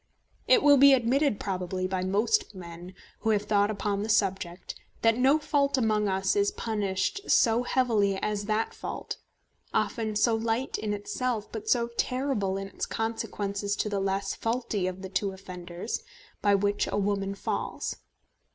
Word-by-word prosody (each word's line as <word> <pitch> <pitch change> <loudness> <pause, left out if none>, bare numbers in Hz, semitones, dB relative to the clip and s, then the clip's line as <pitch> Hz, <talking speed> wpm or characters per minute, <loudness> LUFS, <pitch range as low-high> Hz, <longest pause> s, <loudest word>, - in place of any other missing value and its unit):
It - - +5
will 285 -1 +7
be 280 +1 +8
admitted 260 0 +1
probably 185 -1 -2
by 185 0 -2
most 215 - +1
men 175 0 -9 0.2
who 225 - -1
have 210 -2 +2
thought 205 -1 +2
upon 205 -1 -1
the 215 - -3
subject 190 -4 0 0.3
that 225 0 +5
no 265 +5 +4
fault 280 -2 +1
among 215 -4 +2
us 190 - +1
is 405 0 +3
punished 215 - -2
so 230 0 +4
heavily 225 -6 +2
as 205 +1 -2
that 215 +1 0
fault, - - -5 0.6
often 220 -3 0
so 230 +2 +3
light 225 +3 -1
in 215 - -2
itself 215 +2 -2
but 220 -1 -5
so 235 -2 +3
terrible 250 -8 0
in 195 0 -4
its - - -5
consequences 205 -2 -2
to 210 - -1
the 200 -1 -1
less 195 0 -1
faulty 225 -5 -1
of 185 +1 -5
the 190 - -5
two 195 +1 -1
offenders, 180 +1 -6 0.4
by 205 -1 +4
which 205 +1 +1
a - - -2
woman 200 -1 0
falls. - - -3
210 Hz, 160 wpm, -28 LUFS, 195-235 Hz, 0.6 s, be